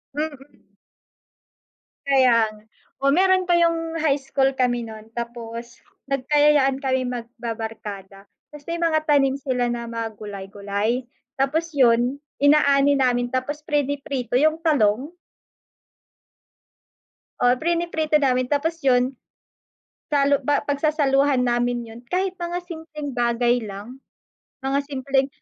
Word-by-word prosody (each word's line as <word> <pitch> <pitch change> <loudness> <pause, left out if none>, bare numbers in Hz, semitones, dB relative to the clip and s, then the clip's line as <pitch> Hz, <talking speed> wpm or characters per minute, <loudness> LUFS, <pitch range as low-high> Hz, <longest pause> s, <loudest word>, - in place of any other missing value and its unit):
Mm. 295 -2 -6 1.5
Kaya, 250 -5 +4 0.5
oh, 275 0 +3
meron 375 +2 +3
pa 355 - +2
yung 330 -1 +1
high 290 -3 +2
school 270 0 0
kami 245 -1 +1
nun 220 0 -11
tapos 235 0 -7 0.3
nagkayayaan 275 0 +3
kaming 260 -2 0
magbabarkada 220 -4 -7 0.3
tas 295 0 -13
may 335 - -2
mga 315 -2 +1
tanim 275 -2 +3
sila 250 -3 -1
na 235 0 -4
mga 230 -1 -4
gulay 200 -2 -7
gulay 200 +2 -1 0.5
tapos 315 +5 0
yun 245 -1 +3 0.2
inaani 285 -1 +4
namin 245 -1 +1
tapos 285 +4 -3
prini-prito 280 -5 -2
yung 310 +4 +3
talong. 285 -2 +1 2.3
O - - +3
prino-prito 320 -1 0
namin 255 -2 +1
tapos 325 +3 0
yun 255 0 +2 1.0
salu 280 -1 +3
ba 290 -1 +1
pagsasaluhan 285 -2 +2
namin 240 0 0
yun 225 +1 -11
kahit 375 +1 0
mga 345 -1 -4
simpleng 320 -4 -7
bagay 240 0 +1
lang, 210 +6 -8 0.6
mga 270 +1 0
simpleng 270 -1 0
270 Hz, 115 wpm, -23 LUFS, 240-295 Hz, 2.3 s, Kaya